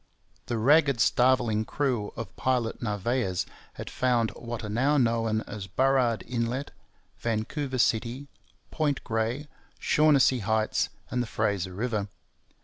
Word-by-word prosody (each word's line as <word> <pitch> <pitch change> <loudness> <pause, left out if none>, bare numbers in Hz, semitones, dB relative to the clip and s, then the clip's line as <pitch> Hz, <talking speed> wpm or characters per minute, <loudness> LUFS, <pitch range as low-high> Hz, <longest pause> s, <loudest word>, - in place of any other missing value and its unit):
The 120 - -1
ragged 140 +2 +4
starveling 120 -3 +3
crew 120 -4 -1
of 115 -5 -7
Pilot 125 -3 -1
Narvaez 105 -3 -1 0.3
had - - -8
found 120 -3 +1
what 120 -2 -6
are - - -4
now 130 +8 +2
known 115 -3 +1
as 105 -3 -7
Burrard 130 +2 +2
Inlet, 120 +3 -2 0.5
Vancouver 130 +5 -2
City, 120 +3 +1 0.5
Point 150 -3 0
Grey, 115 +6 -2 0.3
Shaughnessy 145 -4 +4
Heights, 110 +1 0 0.2
and 125 - 0
the 120 - -3
Fraser 100 -5 -1
River. 105 -2 -1
120 Hz, 125 wpm, -27 LUFS, 110-130 Hz, 0.5 s, ragged